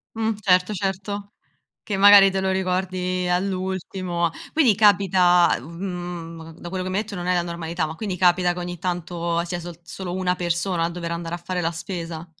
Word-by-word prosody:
Mh, 225 0 0
certo 185 +1 +3
certo. 200 +1 -3 0.5
Che 205 -3 -3
magari 200 0 +8
te 190 0 -1
lo 190 - +1
ricordi 185 -1 -1
all'ultimo. 185 -2 -1 0.2
Quindi 275 -10 +4
capita, 185 -4 +4
mhmm, 170 0 -7
da 175 - -7
quello 185 0 -3
che 185 - -3
mi 190 - -2
hai 210 - +2
detto 210 -2 -9
non 175 -1 -5
è 180 - +2
la 175 - +2
normalità, 170 -1 -3
ma 155 - -6
quindi 195 -1 -4
capita 180 0 +4
che 175 - -7
ogni 175 -1 -5
tanto 170 -1 -2
sia 175 0 -4
sol 170 -1 -8
solo 175 +1 -6
una 180 -1 0
persona 170 0 -1
a 170 - 0
dover 170 -1 -5
andare 170 0 -4
a - - -4
fare 180 +1 -3
la 165 - +1
spesa? 165 -1 -6
180 Hz, 195 wpm, -23 LUFS, 170-190 Hz, 0.5 s, magari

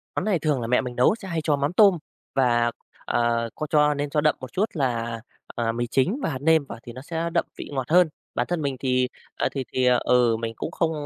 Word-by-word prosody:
Món - - -1
này 200 -5 +1
thường 145 -4 0
là 115 - -3
mẹ 125 +1 +3
mình 125 -2 -6
nấu 125 - +4
sẽ 205 -4 -10
hay 165 -3 -2
cho 150 -1 +2
mắm 140 +3 -1
tôm 195 -2 +6 0.4
và, 120 -3 +3 0.3
ờ, 115 -1 +1
có 155 - -4
cho 150 -1 +4
nên 145 0 -3
cho 150 +1 +1
đậm 150 0 +3
một 130 -1 -8
chút 200 - +2
là, 115 -6 -2 0.3
à, 115 -1 0
mì 120 +1 -2
chính 135 - +1
và - - +1
hạt 140 - -3
nêm 160 -1 +4
vào 135 - -9
thì 120 - -9
nó 130 - -9
sẽ 165 +3 -3
đậm - - +2
vị - - -7
ngọt 130 -3 -3
hơn. 175 0 +5 0.3
Bản - - 0
thân 175 -2 -1
mình 140 -2 -1
thì, 125 -1 +1 0.3
à, - - 0
thì 135 - -3
thì, 130 - +1
à, 125 0 +5
ừ, 120 -2 +3
mình 115 -1 -3
cũng - - -5
không 165 -1 0
135 Hz, 260 wpm, -24 LUFS, 120-160 Hz, 0.4 s, tôm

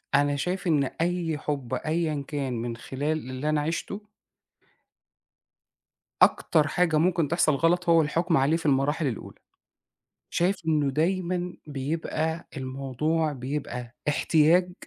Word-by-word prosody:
أنا 145 0 +3
شايف 180 +6 -2
إن 150 -4 +3 0.2
أي 170 -3 0
حب 140 -5 -4
أيًا 155 -2 -1
كان 140 -4 -2
من 115 0 -3
خلال 145 +3 -3
اللي 130 +4 -3
أنا 155 -1 +2
عِشته 170 +6 -3 2.2
أكتر 155 -3 +4
حاجة 165 -1 +2
ممكن 165 -1 +2
تحصل 160 -3 +2
غلط 170 +3 +2
هو 165 -1 +6
الحكم 165 +2 +1
عليه 145 +5 +3
في 165 - -9
المراحل 145 +2 +2
الأولى، 115 - -5 0.9
شايف 185 +3 +1
إنه 150 -3 +2
دايمًا 180 +3 0
بيبقى 160 +3 -3
الموضوع 135 +4 -1
بيبقى 125 -2 -5
احتياج 165 +4 +3
155 Hz, 120 wpm, -26 LUFS, 140-170 Hz, 2.2 s, هو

